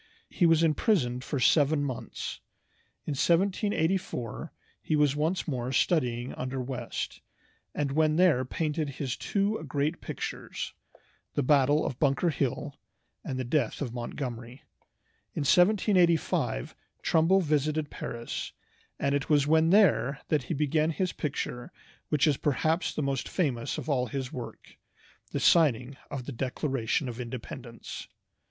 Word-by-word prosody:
He 175 Hz, -, +3 dB
was 165 Hz, 0 st, +4 dB
imprisoned 150 Hz, -, +2 dB
for 140 Hz, 0 st, -2 dB
seven 145 Hz, +2 st, +4 dB
months. 130 Hz, -4 st, -5 dB, 0.7 s
In -, -, -3 dB
1784 175 Hz, -, 0 dB, 0.3 s
he 155 Hz, -, 0 dB
was 145 Hz, -2 st, +3 dB
once 160 Hz, +5 st, 0 dB
more 130 Hz, -4 st, -2 dB
studying 125 Hz, -5 st, +1 dB
under 130 Hz, +1 st, -4 dB
West, 125 Hz, -2 st, -4 dB, 0.5 s
and 145 Hz, -2 st, -1 dB
when 155 Hz, +1 st, +3 dB
there 170 Hz, -7 st, +4 dB
painted 150 Hz, +3 st, -2 dB
his 135 Hz, -3 st, -2 dB
two 200 Hz, -1 st, -1 dB
great 145 Hz, +4 st, -1 dB
pictures, -, -, -5 dB, 0.6 s
the 145 Hz, -, +1 dB
"Battle 145 Hz, +2 st, +4 dB
of 125 Hz, -, -4 dB
Bunker 145 Hz, +4 st, +2 dB
Hill," 135 Hz, -4 st, -2 dB, 0.4 s
and 130 Hz, -, -4 dB
the 130 Hz, -, -1 dB
"Death 125 Hz, -2 st, 0 dB
of 125 Hz, -5 st, -3 dB
Montgomery." 120 Hz, 0 st, -6 dB, 0.7 s
In -, -, -1 dB
1785 175 Hz, -, +3 dB, 0.3 s
Trumbull 165 Hz, +4 st, +4 dB
visited 155 Hz, -1 st, 0 dB
Paris, 120 Hz, 0 st, -5 dB, 0.5 s
and 140 Hz, 0 st, +1 dB
it 140 Hz, -1 st, -1 dB
was 145 Hz, -2 st, +4 dB
when 160 Hz, +2 st, +4 dB
there 175 Hz, -8 st, +4 dB
that 150 Hz, -2 st, +2 dB
he 165 Hz, -, -2 dB
began 150 Hz, +2 st, +1 dB
his 180 Hz, +2 st, -1 dB
picture 125 Hz, -4 st, -4 dB, 0.4 s
which 150 Hz, -3 st, +3 dB
is 150 Hz, -4 st, +3 dB
perhaps 160 Hz, +4 st, +1 dB
the 155 Hz, -, -3 dB
most 135 Hz, -2 st, -1 dB
famous 135 Hz, -10 st, -1 dB
of -, -, -6 dB
all 130 Hz, -4 st, +1 dB
his 135 Hz, -2 st, -4 dB
work, 125 Hz, -2 st, -8 dB, 0.5 s
the -, -, -2 dB
signing 140 Hz, -6 st, +4 dB
of 130 Hz, -3 st, -5 dB
"The 145 Hz, -, -5 dB
Declaration 130 Hz, +1 st, -1 dB
of 120 Hz, 0 st, -6 dB
Independence." 125 Hz, -1 st, -7 dB
145 Hz, 135 wpm, -29 LUFS, 130-160 Hz, 0.7 s, was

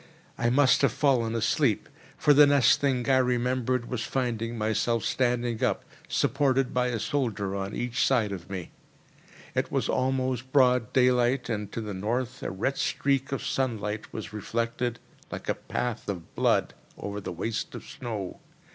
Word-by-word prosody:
I 120 Hz, -, +1 dB
must 130 Hz, +1 st, +4 dB
have 140 Hz, -5 st, +4 dB
fallen 120 Hz, -4 st, +2 dB
asleep; 115 Hz, +1 st, +1 dB, 0.3 s
for 150 Hz, -, +5 dB
the 145 Hz, +1 st, +8 dB
next 140 Hz, -4 st, +4 dB
thing 130 Hz, -4 st, +1 dB
I 135 Hz, -1 st, +5 dB
remembered 125 Hz, -1 st, +1 dB
was 125 Hz, -3 st, -3 dB
finding 120 Hz, -3 st, -2 dB
myself 110 Hz, +2 st, 0 dB
standing 120 Hz, -2 st, 0 dB
up, -, -, 0 dB, 0.2 s
supported 135 Hz, 0 st, +1 dB
by 125 Hz, 0 st, +2 dB
a 120 Hz, -2 st, -1 dB
soldier 105 Hz, -8 st, -1 dB
on 100 Hz, +1 st, -3 dB
each 120 Hz, -1 st, 0 dB
side 115 Hz, -6 st, +2 dB
of 95 Hz, -4 st, -7 dB
me. 95 Hz, -3 st, -5 dB, 0.8 s
It -, -, -1 dB
was -, -, 0 dB
almost 130 Hz, -1 st, 0 dB
broad 125 Hz, -4 st, +4 dB
daylight, 125 Hz, 0 st, +3 dB
and 105 Hz, -3 st, -3 dB
to 115 Hz, -, -3 dB
the 105 Hz, -2 st, -5 dB
north 120 Hz, +6 st, -2 dB
a -, -, -3 dB
red 105 Hz, +9 st, -2 dB
streak 135 Hz, 0 st, 0 dB
of 135 Hz, -, -3 dB
sunlight 110 Hz, -5 st, -2 dB
was 105 Hz, -3 st, -7 dB
reflected, 115 Hz, +3 st, -2 dB, 0.3 s
like -, -, -6 dB
a -, -, +2 dB
path 120 Hz, -4 st, -4 dB
of 90 Hz, -5 st, -5 dB
blood, -, -, +2 dB, 0.2 s
over 100 Hz, 0 st, -5 dB
the -, -, -5 dB
waste 110 Hz, +6 st, -3 dB
of -, -, -8 dB
snow. 110 Hz, -7 st, -6 dB
120 Hz, 165 wpm, -27 LUFS, 110-130 Hz, 0.8 s, the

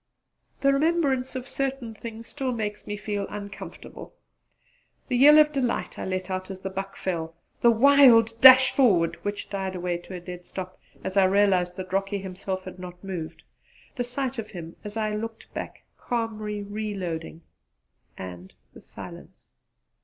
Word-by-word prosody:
The 275 Hz, 0 st, +4 dB
remembrance 275 Hz, -4 st, +1 dB
of 255 Hz, 0 st, -5 dB
certain 270 Hz, -5 st, -3 dB
things 225 Hz, +1 st, -9 dB
makes 220 Hz, -5 st, -2 dB
me 205 Hz, -, -3 dB
feel 205 Hz, -1 st, -3 dB
uncomfortable; 200 Hz, -1 st, -9 dB, 0.9 s
the 250 Hz, -, +1 dB
yell 290 Hz, +5 st, +8 dB
of 305 Hz, 0 st, +6 dB
delight 255 Hz, -4 st, -1 dB
I -, -, -3 dB
let 185 Hz, 0 st, -3 dB
out 185 Hz, 0 st, -3 dB
as 190 Hz, -1 st, -7 dB
the 190 Hz, -, -4 dB
buck 195 Hz, +1 st, -5 dB
fell; 165 Hz, -3 st, -3 dB, 0.3 s
the 235 Hz, -, +6 dB
wild 235 Hz, -2 st, +6 dB
dash 260 Hz, 0 st, +10 dB
forward, 190 Hz, -11 st, +3 dB
which 205 Hz, 0 st, -3 dB
died 190 Hz, -1 st, -3 dB
away 175 Hz, -1 st, -2 dB
to 185 Hz, +2 st, -9 dB
a -, -, -5 dB
dead 180 Hz, 0 st, -9 dB
stop 185 Hz, -1 st, -7 dB, 0.2 s
as 190 Hz, -, -3 dB
I 195 Hz, -, +6 dB
realised 185 Hz, -2 st, +3 dB
that 185 Hz, 0 st, -7 dB
Rocky 195 Hz, +1 st, 0 dB
himself 190 Hz, 0 st, -5 dB
had 185 Hz, 0 st, -9 dB
not 180 Hz, 0 st, -9 dB
moved; 170 Hz, -4 st, -6 dB, 0.5 s
the 245 Hz, -, -1 dB
sight 250 Hz, 0 st, -3 dB
of 215 Hz, -1 st, -5 dB
him, 170 Hz, -4 st, -8 dB
as 210 Hz, +1 st, -7 dB
I 215 Hz, -1 st, 0 dB
looked 225 Hz, +1 st, -6 dB
back, -, -, -6 dB, 0.2 s
calmly 215 Hz, -3 st, -3 dB
reloading; 195 Hz, -6 st, -5 dB, 0.7 s
and 90 Hz, 0 st, -8 dB, 0.2 s
the -, -, -13 dB
silence. -, -, -12 dB
205 Hz, 160 wpm, -26 LUFS, 185-240 Hz, 0.9 s, dash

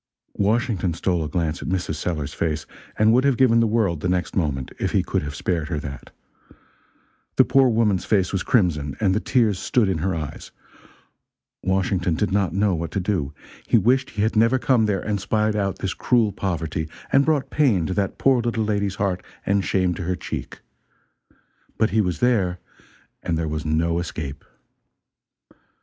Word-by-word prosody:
Washington 100 Hz, -4 st, +1 dB
stole 85 Hz, -1 st, 0 dB
a 75 Hz, -, -4 dB
glance 85 Hz, -2 st, -2 dB
at -, -, -6 dB
Mrs. 90 Hz, -3 st, -1 dB
Sellers's 75 Hz, -2 st, -3 dB
face, 75 Hz, -3 st, -2 dB, 0.3 s
and 110 Hz, +1 st, +4 dB
would 125 Hz, +2 st, +4 dB
have 140 Hz, -3 st, +2 dB
given 120 Hz, -3 st, +5 dB
the 115 Hz, -, +3 dB
world, 105 Hz, -7 st, +1 dB
the 90 Hz, -, -2 dB
next 90 Hz, 0 st, -1 dB
moment, 70 Hz, -7 st, -1 dB
if -, -, -1 dB
he -, -, +3 dB
could -, -, -1 dB
have 75 Hz, 0 st, -6 dB
spared 85 Hz, 0 st, -2 dB
her 80 Hz, -4 st, -2 dB
that. 70 Hz, -2 st, -8 dB, 1.3 s
The -, -, +5 dB
poor 135 Hz, -1 st, +4 dB
woman's 110 Hz, -5 st, +2 dB
face 95 Hz, -4 st, +1 dB
was 95 Hz, -, 0 dB
crimson, 75 Hz, -, +1 dB
and 95 Hz, -3 st, +2 dB
the 105 Hz, -, +1 dB
tears 110 Hz, -6 st, +1 dB
stood 120 Hz, -5 st, +1 dB
in 95 Hz, -4 st, 0 dB
her 95 Hz, +3 st, -1 dB
eyes. 75 Hz, -3 st, -6 dB, 1.1 s
Washington 95 Hz, -2 st, 0 dB
did 105 Hz, +4 st, -1 dB
not 100 Hz, -4 st, +1 dB
know 100 Hz, +2 st, +1 dB
what 85 Hz, -1 st, -3 dB
to -, -, 0 dB
do. 90 Hz, -7 st, -1 dB, 0.4 s
He -, -, +4 dB
wished 130 Hz, +3 st, +2 dB
he 105 Hz, -, -2 dB
had 110 Hz, +1 st, 0 dB
never 115 Hz, +4 st, +4 dB
come 125 Hz, -4 st, +2 dB
there 100 Hz, -3 st, 0 dB
and 105 Hz, -2 st, -2 dB
spied 110 Hz, +2 st, 0 dB
out 100 Hz, -2 st, -1 dB
this 95 Hz, -, -3 dB
cruel 115 Hz, -4 st, +2 dB
poverty 80 Hz, -5 st, -3 dB, 0.2 s
and 140 Hz, -, +6 dB
brought 140 Hz, -3 st, 0 dB
pain 115 Hz, -, +2 dB
to 95 Hz, -, -2 dB
that 100 Hz, 0 st, -1 dB
poor 130 Hz, -3 st, +3 dB
little 115 Hz, -1 st, -1 dB
lady's 100 Hz, -2 st, -1 dB
heart 95 Hz, -2 st, -1 dB, 0.2 s
and 100 Hz, 0 st, +2 dB
shame 95 Hz, -2 st, +1 dB
to 95 Hz, -, -6 dB
her 90 Hz, +1 st, -1 dB
cheek; -, -, -6 dB, 1.2 s
but 110 Hz, -, +2 dB
he 110 Hz, +1 st, +3 dB
was 90 Hz, -4 st, -2 dB
there, 100 Hz, -8 st, +2 dB, 0.6 s
and 80 Hz, -, -1 dB
there 80 Hz, 0 st, -1 dB
was 75 Hz, 0 st, -3 dB
no 85 Hz, +2 st, +1 dB
escape. 75 Hz, -5 st, -5 dB
95 Hz, 185 wpm, -23 LUFS, 85-110 Hz, 1.3 s, and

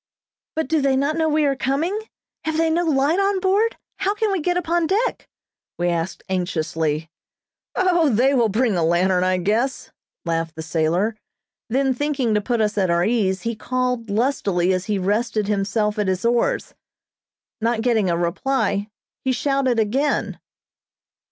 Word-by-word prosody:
"But 320 Hz, -3 st, -1 dB
do 315 Hz, +1 st, +1 dB
they 270 Hz, -1 st, +2 dB
not 280 Hz, +3 st, +1 dB
know 320 Hz, -1 st, +1 dB
we 305 Hz, 0 st, +2 dB
are 275 Hz, -1 st, +2 dB
coming? 280 Hz, +9 st, -1 dB, 0.5 s
Have 315 Hz, 0 st, -1 dB
they 325 Hz, 0 st, +2 dB
no 340 Hz, +2 st, +2 dB
light 300 Hz, +3 st, +2 dB
on 395 Hz, 0 st, +2 dB
board? 400 Hz, +5 st, +1 dB, 0.2 s
How 395 Hz, +2 st, 0 dB
can 425 Hz, 0 st, 0 dB
we 385 Hz, -4 st, 0 dB
get 355 Hz, +3 st, 0 dB
upon 345 Hz, -1 st, 0 dB
deck?" 435 Hz, +8 st, -1 dB, 0.5 s
we 175 Hz, 0 st, +1 dB
asked 170 Hz, +2 st, -3 dB
anxiously. 160 Hz, -4 st, -1 dB, 0.7 s
"O, 350 Hz, -4 st, +3 dB
they 255 Hz, +4 st, +3 dB
will 235 Hz, -4 st, +3 dB
bring 220 Hz, 0 st, +1 dB
a 170 Hz, -, +1 dB
lantern, 180 Hz, +2 st, +2 dB
I 185 Hz, 0 st, +2 dB
guess," 220 Hz, +9 st, -1 dB, 0.3 s
laughed 165 Hz, -1 st, -2 dB
the 160 Hz, -, -6 dB
sailor, 170 Hz, +7 st, 0 dB, 0.5 s
then 265 Hz, +2 st, +2 dB
thinking 270 Hz, -4 st, 0 dB
to 210 Hz, -, +2 dB
put 235 Hz, +2 st, 0 dB
us 210 Hz, -1 st, 0 dB
at 190 Hz, -2 st, +1 dB
our 170 Hz, +1 st, +2 dB
ease, 200 Hz, -5 st, 0 dB
he 230 Hz, 0 st, -2 dB
called 250 Hz, 0 st, -2 dB
lustily 200 Hz, -6 st, +1 dB
as 185 Hz, 0 st, -2 dB
he 210 Hz, -2 st, 0 dB
rested 210 Hz, +2 st, 0 dB
himself 210 Hz, +1 st, 0 dB
at 205 Hz, -, 0 dB
his 185 Hz, +3 st, -1 dB
oars. 240 Hz, -, +1 dB, 0.9 s
Not 230 Hz, 0 st, +1 dB
getting 225 Hz, -6 st, +2 dB
a 170 Hz, -, +1 dB
reply, 200 Hz, +3 st, 0 dB, 0.3 s
he 265 Hz, -, +1 dB
shouted 260 Hz, -1 st, +1 dB
again. 255 Hz, +7 st, 0 dB
235 Hz, 165 wpm, -22 LUFS, 190-290 Hz, 0.9 s, O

